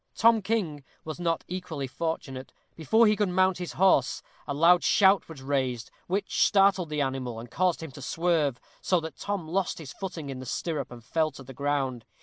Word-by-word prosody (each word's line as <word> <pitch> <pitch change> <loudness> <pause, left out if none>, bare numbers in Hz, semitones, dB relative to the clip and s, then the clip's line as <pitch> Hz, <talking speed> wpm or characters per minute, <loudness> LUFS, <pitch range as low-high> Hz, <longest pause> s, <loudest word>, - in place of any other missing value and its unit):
Tom 230 -1 +5
King 185 -9 -1 0.2
was 155 +1 -6
not 165 -2 0
equally 175 -6 -4
fortunate. 135 -2 -4 0.2
Before 220 +9 +4
he 210 -1 +4
could 210 -2 +1
mount 185 0 +2
his 180 - -5
horse, 180 -9 +3 0.2
a 145 - -2
loud 170 +3 +5
shout 195 -2 +4
was 145 -5 -10
raised, 130 -4 -1 0.2
which 200 +3 +1
startled 195 -4 +4
the 150 -1 -1
animal, 130 -4 -2
and 115 +1 -10
caused 180 -2 +1
him 160 - -7
to 140 - -11
swerve, 155 -2 0 0.2
so 180 - +2
that 160 0 -7
Tom 200 -5 -3
lost 185 +2 -1
his 145 -6 -8
footing 165 -7 -6
in 130 - -6
the 130 - -8
stirrup, 150 -1 -3
and 120 -1 -11
fell 160 +6 +1
to 135 - -10
the 135 +1 -11
ground. 135 -3 -1
160 Hz, 195 wpm, -27 LUFS, 135-185 Hz, 0.2 s, Tom